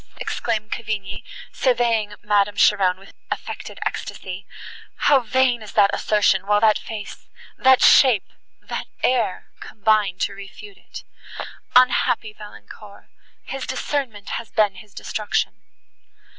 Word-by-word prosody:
exclaimed 215 Hz, -2 st, -3 dB
Cavigni, 205 Hz, -4 st, -4 dB, 0.3 s
surveying 230 Hz, -5 st, +1 dB
Madame 205 Hz, -1 st, +2 dB
Cheron 190 Hz, -3 st, +4 dB
with 195 Hz, +1 st, -16 dB, 0.2 s
affected -, -, -6 dB
ecstasy, 190 Hz, +1 st, -5 dB, 0.5 s
"how 285 Hz, -2 st, +4 dB
vain 250 Hz, 0 st, +1 dB
is 215 Hz, -, -10 dB
that 200 Hz, -2 st, +4 dB
assertion, 200 Hz, -2 st, +2 dB
while 205 Hz, 0 st, +4 dB
that 215 Hz, -1 st, +4 dB
face—that 230 Hz, +4 st, -1 dB
shape—that 250 Hz, -8 st, +2 dB, 0.2 s
air—combine 215 Hz, -3 st, 0 dB
to 200 Hz, -, -1 dB
refute 200 Hz, -, -12 dB
it! -, -, -11 dB, 0.7 s
Unhappy 245 Hz, -3 st, +3 dB
Valancourt! 210 Hz, -1 st, -13 dB, 0.3 s
his 270 Hz, -1 st, -6 dB
discernment 235 Hz, -9 st, -3 dB
has 225 Hz, -, -17 dB
been 210 Hz, -3 st, +2 dB
his 195 Hz, +2 st, -15 dB
destruction." 215 Hz, -1 st, -2 dB
215 Hz, 105 wpm, -22 LUFS, 200-240 Hz, 0.7 s, Cheron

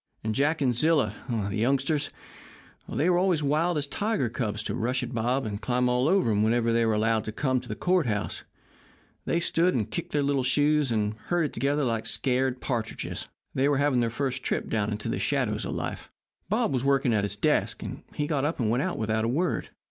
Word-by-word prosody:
And 110 Hz, 0 st, -1 dB
Jack 145 Hz, +5 st, +1 dB
and 130 Hz, -3 st, +3 dB
Zilla 155 Hz, +5 st, +2 dB, 0.2 s
the 105 Hz, -4 st, -1 dB
youngsters 140 Hz, +5 st, +1 dB, 0.8 s
they 160 Hz, -, 0 dB
were 175 Hz, -1 st, +4 dB
always 180 Hz, -5 st, +2 dB
wild 155 Hz, +4 st, +1 dB
as 145 Hz, -, 0 dB
tiger 200 Hz, -, -1 dB
cubs 110 Hz, -3 st, -2 dB
to -, -, -3 dB
rush 125 Hz, +3 st, -1 dB
at 125 Hz, +1 st, -5 dB
Bob 125 Hz, +4 st, 0 dB
and 105 Hz, -1 st, -4 dB
climb 125 Hz, 0 st, +1 dB
all 125 Hz, +2 st, +2 dB
over 185 Hz, -, +3 dB
him 105 Hz, 0 st, +2 dB
whenever 115 Hz, +1 st, +2 dB
they 115 Hz, 0 st, +3 dB
were 110 Hz, -, +2 dB
allowed 110 Hz, +1 st, +1 dB
to 110 Hz, -, -3 dB
come 130 Hz, +2 st, 0 dB
to 125 Hz, -, -13 dB
the -, -, -3 dB
court 180 Hz, -5 st, +1 dB
house 105 Hz, -2 st, -2 dB, 0.8 s
they 170 Hz, -, +1 dB
stood 170 Hz, 0 st, +3 dB
and 110 Hz, -5 st, -1 dB
kicked 170 Hz, -, -4 dB
their 145 Hz, -1 st, +1 dB
little 140 Hz, -1 st, +1 dB
shoes, 145 Hz, +1 st, +2 dB
and 105 Hz, -2 st, 0 dB
herded 170 Hz, -5 st, 0 dB
together 145 Hz, +2 st, 0 dB
like 115 Hz, -3 st, -1 dB
scared 130 Hz, +1 st, +1 dB
partridges. 115 Hz, -4 st, -3 dB, 0.3 s
They 135 Hz, +2 st, +2 dB
were 145 Hz, -, +2 dB
having 140 Hz, -2 st, +2 dB
their 120 Hz, -1 st, +1 dB
first 130 Hz, +2 st, -2 dB
trip -, -, -2 dB
down 110 Hz, -2 st, 0 dB
into 105 Hz, 0 st, -4 dB
the -, -, -1 dB
shadows -, -, 0 dB
of -, -, -3 dB
life. -, -, -5 dB, 0.4 s
Bob -, -, +1 dB
was 130 Hz, -1 st, 0 dB
working 135 Hz, -3 st, +2 dB
at 105 Hz, -2 st, +2 dB
his 100 Hz, -, -2 dB
desk, -, -, 0 dB
and -, -, -6 dB
he 150 Hz, -, -1 dB
got 145 Hz, -3 st, 0 dB
up 150 Hz, +2 st, -1 dB
and 110 Hz, -3 st, +1 dB
went 120 Hz, +3 st, +1 dB
out 185 Hz, +3 st, -2 dB
without 110 Hz, 0 st, 0 dB
a -, -, +1 dB
word. 160 Hz, +9 st, 0 dB
130 Hz, 220 wpm, -27 LUFS, 115-145 Hz, 0.8 s, were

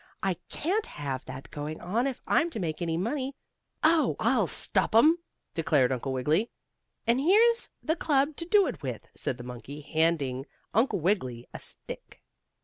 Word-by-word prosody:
I 190 Hz, -1 st, +2 dB, 0.2 s
can't 395 Hz, +8 st, -1 dB
have 135 Hz, -3 st, -4 dB
that 130 Hz, +1 st, -9 dB
going 150 Hz, +1 st, -5 dB
on 225 Hz, +9 st, 0 dB
if 260 Hz, -2 st, -5 dB
I'm 330 Hz, -, +3 dB
to 235 Hz, -, -5 dB
make 165 Hz, -2 st, -3 dB
any 165 Hz, -1 st, 0 dB
money." 260 Hz, -, -2 dB, 0.5 s
"Oh, 315 Hz, 0 st, +4 dB
I'll -, -, +3 dB
stop -, -, +1 dB
'em!" 315 Hz, +9 st, +6 dB, 0.3 s
declared 150 Hz, -6 st, +2 dB
Uncle 130 Hz, +1 st, -2 dB
Wiggily. 150 Hz, -, +1 dB, 0.6 s
"And 235 Hz, +3 st, +3 dB
here's 455 Hz, +8 st, +4 dB
the 320 Hz, -, +1 dB
club 290 Hz, -3 st, +1 dB
to 335 Hz, -, -3 dB
do 400 Hz, +3 st, +5 dB
it -, -, -4 dB
with," -, -, -5 dB
said 125 Hz, -, -2 dB
the 120 Hz, -, -8 dB
monkey, 125 Hz, +4 st, -8 dB
handing 145 Hz, -3 st, 0 dB, 0.3 s
Uncle 220 Hz, -3 st, +2 dB
Wiggily 130 Hz, -, 0 dB
a -, -, -6 dB
stick. -, -, -4 dB
185 Hz, 165 wpm, -28 LUFS, -, 0.6 s, em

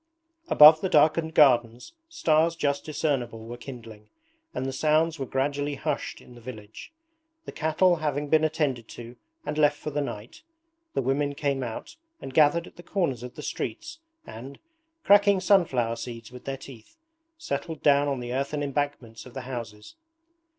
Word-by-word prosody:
Above 155 Hz, -, +8 dB
the 190 Hz, -, -1 dB
darkened 160 Hz, +1 st, +3 dB
gardens 120 Hz, -, +3 dB, 0.2 s
stars 165 Hz, -, +2 dB
just 140 Hz, -3 st, -1 dB
discernible 125 Hz, -7 st, -2 dB
were 120 Hz, +1 st, -7 dB
kindling, 115 Hz, -4 st, -11 dB, 0.4 s
and 130 Hz, -, -4 dB
the 135 Hz, -, -3 dB
sounds 155 Hz, +2 st, +1 dB
were 135 Hz, -, -3 dB
gradually 145 Hz, +2 st, -1 dB
hushed 135 Hz, -, -3 dB
in 125 Hz, -, -16 dB
the 120 Hz, -, -14 dB
village. 110 Hz, -, -10 dB, 0.5 s
The -, -, -7 dB
cattle 170 Hz, +3 st, +2 dB
having 150 Hz, -2 st, -2 dB
been 155 Hz, +1 st, +3 dB
attended 150 Hz, -7 st, -1 dB
to 120 Hz, +1 st, -10 dB, 0.3 s
and 155 Hz, -, -3 dB
left 145 Hz, -1 st, +4 dB
for 150 Hz, -, -6 dB
the 145 Hz, +1 st, -1 dB
night, 110 Hz, -5 st, -7 dB, 0.5 s
the -, -, 0 dB
women 140 Hz, +2 st, 0 dB
came 140 Hz, -2 st, -1 dB
out 125 Hz, -, -6 dB, 0.2 s
and 135 Hz, -, -8 dB
gathered 160 Hz, +3 st, +4 dB
at -, -, -16 dB
the -, -, -10 dB
corners 170 Hz, -, -2 dB
of 125 Hz, 0 st, -9 dB
the 150 Hz, -, -8 dB
streets 335 Hz, -, -5 dB, 0.3 s
and, 130 Hz, +5 st, -10 dB, 0.5 s
cracking 200 Hz, -1 st, +5 dB
sunflower 140 Hz, -, +2 dB
seeds 115 Hz, -1 st, -8 dB
with 125 Hz, -1 st, -12 dB
their 135 Hz, 0 st, -3 dB
teeth, 130 Hz, -, -14 dB, 0.4 s
settled 170 Hz, -, -5 dB
down 145 Hz, 0 st, +4 dB
on 140 Hz, -2 st, -1 dB
the 120 Hz, 0 st, -5 dB
earthen 140 Hz, +2 st, -2 dB
embankments 140 Hz, -5 st, -4 dB
of 125 Hz, -, -15 dB
the 130 Hz, -, -4 dB
houses. 120 Hz, -, -8 dB
140 Hz, 165 wpm, -26 LUFS, 120-155 Hz, 0.5 s, Above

